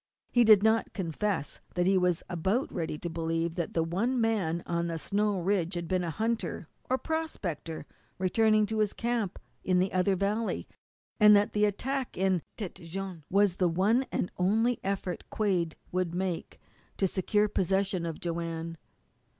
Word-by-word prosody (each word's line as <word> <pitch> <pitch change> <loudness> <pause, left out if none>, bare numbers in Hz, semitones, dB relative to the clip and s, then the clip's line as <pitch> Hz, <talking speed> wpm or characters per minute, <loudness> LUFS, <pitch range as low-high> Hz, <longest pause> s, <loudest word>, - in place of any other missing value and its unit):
He 240 - +5
did 215 -3 +7
not 220 +1 +2
confess 185 -2 -2 0.2
that 175 0 +2
he 195 +1 +4
was 180 -2 +2
about 190 - -1
ready 165 -4 -2
to 175 - -5
believe 165 0 -1
that 170 -2 -3
the 165 -1 +2
man 205 -3 0
on 170 0 -1
the 165 -1 -2
snow 205 +3 0
ridge 180 -1 0
had 170 -1 -3
been 185 0 0
a 170 - -2
hunter 225 +7 -2 0.2
or 260 - +3
a - - -1
prospector 190 - -4 0.3
returning 215 +3 +3
to 220 +1 -2
his 210 -1 +1
camp 235 -5 -1 0.3
in 185 -1 +2
the 185 +1 +1
other 185 +1 +3
valley, 205 +4 -1 0.5
and 210 -1 +8
that 205 0 +3
the 210 0 +3
attack 260 +6 -2
in 190 -2 +2 0.2
Tête 195 -6 -6
Jaune 175 -2 -6
was 200 -1 +3
the 180 -2 +3
one 210 +10 +2
and 180 - -1
only 225 +6 +2
effort 190 -2 -2
Quade 180 -6 0 0.2
would 180 -2 -1
make 180 -2 -3 0.4
to 195 - +2
secure 205 +3 +1
possession 190 -1 0
of 165 -2 -4
Joanne. 165 -1 -4
190 Hz, 165 wpm, -29 LUFS, 170-210 Hz, 0.5 s, and